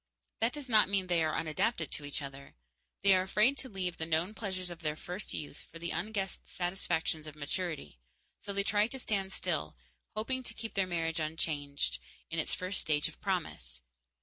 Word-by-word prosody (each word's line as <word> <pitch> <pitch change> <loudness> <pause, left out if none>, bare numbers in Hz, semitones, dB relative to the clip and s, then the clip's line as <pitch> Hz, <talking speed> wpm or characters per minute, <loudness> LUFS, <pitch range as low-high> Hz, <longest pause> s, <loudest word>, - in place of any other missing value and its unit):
That 230 +2 +3
does 290 -3 -4
not 215 -5 +6
mean 195 -2 +2
they 175 -2 +3
are 155 - +1
unadapted 160 +2 +1
to 145 - -2
each 145 0 -1
other. 140 0 -8 0.5
They 200 -1 +8
are 185 - +5
afraid 210 +8 +4
to 260 - -2
leave 185 -3 -2
the 160 - -1
known 165 +5 +2
pleasures 185 -4 -3
of 175 0 -8
their 150 -2 0
first 180 +5 -4
youth 145 -1 -5
for 165 - -8
the 170 +1 -3
unguessed 195 +1 -2
satisfactions 170 -3 0
of 155 - -7
maturity, 150 - -3 0.4
so 205 - -4
they 200 0 +2
try 205 +1 +4
to 265 - -3
stand 195 -6 0
still, - - 0 0.4
hoping 260 +5 0
to 230 -2 -5
keep 225 0 -5
their 195 -1 +2
marriage, 165 -2 0
unchanged, 145 - -1 0.3
in 165 - 0
its 155 - +1
first 185 +1 -1
stage 150 -2 +3
of - - -16
promise. - - -2
175 Hz, 195 wpm, -33 LUFS, 155-200 Hz, 0.5 s, They